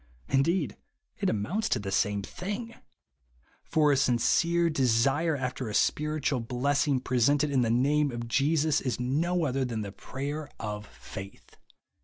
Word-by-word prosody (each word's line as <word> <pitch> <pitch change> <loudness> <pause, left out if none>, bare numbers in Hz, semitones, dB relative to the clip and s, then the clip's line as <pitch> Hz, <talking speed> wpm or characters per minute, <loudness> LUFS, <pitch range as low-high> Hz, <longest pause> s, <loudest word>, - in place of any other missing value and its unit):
Indeed, 140 - +1 0.4
it - - +1
amounts 175 - -1
to - - +2
the 100 -3 -4
same 100 +1 +1
thing; 210 - -5 0.9
for 150 -2 +3
a - - +4
sincere 165 +7 +2
desire 140 +2 +2
after 125 -3 -3
a 105 - -4
spiritual 150 -4 +1
hlessing, 135 +3 +1
presented 140 +4 +2
in 135 -2 +3
the 115 - +1
name 145 +5 +2
of 120 -2 -5
Jesus, 150 +4 +2
is 125 -3 -2
no 160 +7 0
other 135 -1 0
than 115 -4 -3
the 100 -2 -5
prayer 145 +8 -5
of 105 -1 -5
faith." 95 0 -11
135 Hz, 145 wpm, -28 LUFS, 120-150 Hz, 0.9 s, a